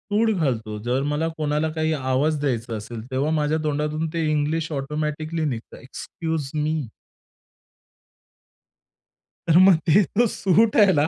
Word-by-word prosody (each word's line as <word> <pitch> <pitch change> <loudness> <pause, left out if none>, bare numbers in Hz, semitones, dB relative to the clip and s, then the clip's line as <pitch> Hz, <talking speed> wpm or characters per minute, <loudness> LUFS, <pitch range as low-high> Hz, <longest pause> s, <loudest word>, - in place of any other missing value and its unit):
मी - - +3
सूट 220 -1 +2
घालतो, 115 -8 -1
जर 125 +3 0
मला 150 +2 0
कोणाला 150 +1 0
काही 160 0 0
आवाज 140 +2 0
द्यायचा 120 -5 -2
असेल 110 +2 -7
तेव्हा 135 +4 0
माझ्या 155 0 +1
तोंडातून 150 +1 -1
ते 165 -1 0
इंग्लिश 155 +2 -1
ऑटोमॅटिकली 150 +3 -3
निघतं. 120 -6 -5
Excuse 155 +2 -5
me. 150 -2 -1 2.6
तर 165 0 +5
मग 185 -1 +7
ते 190 +6 +5
तो 210 +8 +1
सूट 210 +2 +2
आहे 205 -3 +6
ना, 145 +1 +2
150 Hz, 140 wpm, -23 LUFS, 140-160 Hz, 2.6 s, मग